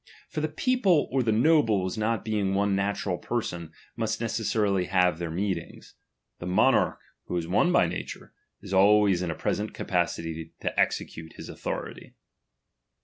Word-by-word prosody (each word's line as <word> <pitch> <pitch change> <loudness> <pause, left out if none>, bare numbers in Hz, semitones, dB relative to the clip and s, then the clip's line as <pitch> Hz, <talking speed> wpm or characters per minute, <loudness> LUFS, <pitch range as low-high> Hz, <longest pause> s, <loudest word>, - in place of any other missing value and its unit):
For - - -3
the - - +1
people 245 - +2
or 135 0 +2
the 115 -2 +1
nobles 110 - +3
not 110 0 -1
being 105 -3 0
one 100 0 +2
natural 100 -2 -1
person, 85 -9 -3 0.2
must 110 -1 -2
necessarily 105 -4 0
have 90 -2 +2
their 85 -1 -3
meetings. 95 +3 -4 0.5
The 90 - -6
monarch, 90 - +3 0.3
who 90 - -3
is 85 -1 -3
one 105 - +3
by 175 - +4
nature, 85 +1 -6 0.3
is 100 - -7
always 100 -1 +5
in 90 - -2
a 80 - -2
pre - - -1
sent 105 +1 -4
capacity 80 -3 -2
to - - -2
execute 80 0 -1
his - - -10
authority. - - -6
100 Hz, 155 wpm, -27 LUFS, 90-110 Hz, 0.5 s, always